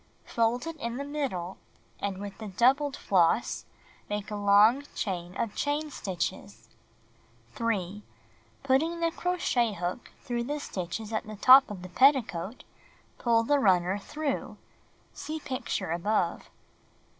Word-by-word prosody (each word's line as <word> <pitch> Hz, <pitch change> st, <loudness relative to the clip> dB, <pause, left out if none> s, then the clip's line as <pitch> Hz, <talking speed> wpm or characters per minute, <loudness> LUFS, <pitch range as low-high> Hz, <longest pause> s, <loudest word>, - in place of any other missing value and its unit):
Fold 235 Hz, +4 st, 0 dB
it 330 Hz, -1 st, -6 dB
in 235 Hz, -4 st, -4 dB
the 280 Hz, -, -3 dB
middle, 265 Hz, -12 st, -4 dB, 0.4 s
and 200 Hz, -2 st, -3 dB
with 200 Hz, 0 st, -7 dB
the 215 Hz, -, -6 dB
doubled 265 Hz, +8 st, +2 dB
floss, 185 Hz, +3 st, +2 dB, 0.4 s
make 205 Hz, 0 st, -3 dB
^11^^ -, -, -12 dB
a -, -, -2 dB
long 210 Hz, +7 st, +6 dB
chain 180 Hz, -3 st, -4 dB
of 220 Hz, -3 st, -2 dB
chain 295 Hz, +1 st, -1 dB
stitches. 185 Hz, -9 st, -5 dB, 0.8 s
■^^^ -, -, -28 dB
3. 210 Hz, -4 st, -2 dB, 0.6 s
Putting 300 Hz, +6 st, +1 dB
the 335 Hz, 0 st, +1 dB
crochet 295 Hz, -11 st, 0 dB
hook 180 Hz, +5 st, -4 dB
through 240 Hz, -1 st, -2 dB
the 295 Hz, +3 st, -3 dB
stitches 205 Hz, -1 st, -5 dB
at 215 Hz, -, -2 dB
the 215 Hz, -, -7 dB
top 260 Hz, +6 st, +8 dB
WiEl^ffi! -, -, -17 dB
of 200 Hz, -3 st, -7 dB
the 185 Hz, -, -8 dB
petticoat, 230 Hz, -, +2 dB, 0.6 s
pull 230 Hz, -1 st, +3 dB
the 285 Hz, +5 st, +2 dB
runner 185 Hz, -3 st, +3 dB
through. 290 Hz, +6 st, -4 dB, 0.6 s
(See 315 Hz, +1 st, -5 dB
picture 255 Hz, -, -3 dB
above.) 175 Hz, 0 st, -1 dB
230 Hz, 145 wpm, -28 LUFS, 195-275 Hz, 0.8 s, top